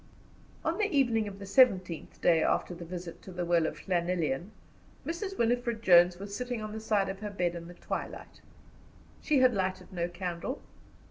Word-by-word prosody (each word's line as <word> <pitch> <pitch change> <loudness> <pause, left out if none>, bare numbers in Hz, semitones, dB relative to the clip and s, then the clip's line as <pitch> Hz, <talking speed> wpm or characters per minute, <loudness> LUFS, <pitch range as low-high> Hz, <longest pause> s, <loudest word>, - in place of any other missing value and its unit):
On - - 0
the 425 - +3
evening 240 - +2
of 195 -1 -7
the 200 - -8
seventeenth 195 - +3
day 165 -2 +5
after 180 - +1
the 170 0 -8
visit 175 0 -7
to 190 - -10
the 175 -1 -3
well 170 -2 +3
of - - -7
Llanelian, 175 -3 0 0.6
Mrs. 380 +4 -4
Winifred 235 -1 0
Jones 175 -2 +6
was 200 +2 -6
sitting 245 +1 -3
on 215 -1 -5
the 220 - -5
side 210 -3 +1
of 195 0 -5
her 210 0 -4
bed 180 -4 -1
in 170 -1 -7
the 175 - -11
twilight. - - -6 0.8
She 300 - +2
had 255 -1 +6
lighted 190 -1 -2
no 170 -1 -1
candle. 175 +7 -4
190 Hz, 185 wpm, -30 LUFS, 175-225 Hz, 0.8 s, Jones